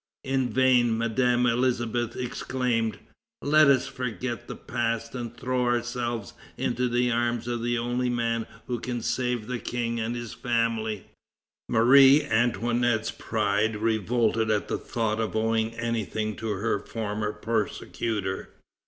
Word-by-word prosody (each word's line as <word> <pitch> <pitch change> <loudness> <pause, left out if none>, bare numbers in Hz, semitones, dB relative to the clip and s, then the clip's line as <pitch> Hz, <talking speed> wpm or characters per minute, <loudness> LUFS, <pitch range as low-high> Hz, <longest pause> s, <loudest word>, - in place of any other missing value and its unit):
In 130 -2 0
vain 125 -2 +3
Madame 120 +2 +2
Elisabeth 120 -1 0
exclaimed: 125 -2 -1 0.5
"Let 155 +1 +6
us 135 -2 +4
forget 125 -1 -4
the - - -6
past 115 0 -2
and 120 -2 -6
throw 130 0 -1
ourselves 120 -3 -1 0.2
into 125 0 0
the 125 +1 +2
arms 120 0 0
of 120 -1 -2
the 120 +1 0
only 120 +1 0
man 115 -1 -1 0.2
who 120 -2 -3
can 120 -1 -4
save 125 -3 -1
the 125 0 -3
King 115 -1 -2
and 115 +1 -2
his 120 -2 -5
family!" 115 -4 -1 0.6
Marie 135 +5 +7
Antoinette's 120 0 +1
pride 105 0 0
revolted 110 +1 +1
at 105 -1 0
the - - -1
thought 110 -2 -1
of 110 -1 -2
owing 110 0 +1
anything 110 -2 -2
to 115 - -4
her 105 +1 0
former 105 0 -3
persecutor. 105 -2 -2
115 Hz, 135 wpm, -27 LUFS, 110-125 Hz, 0.6 s, Marie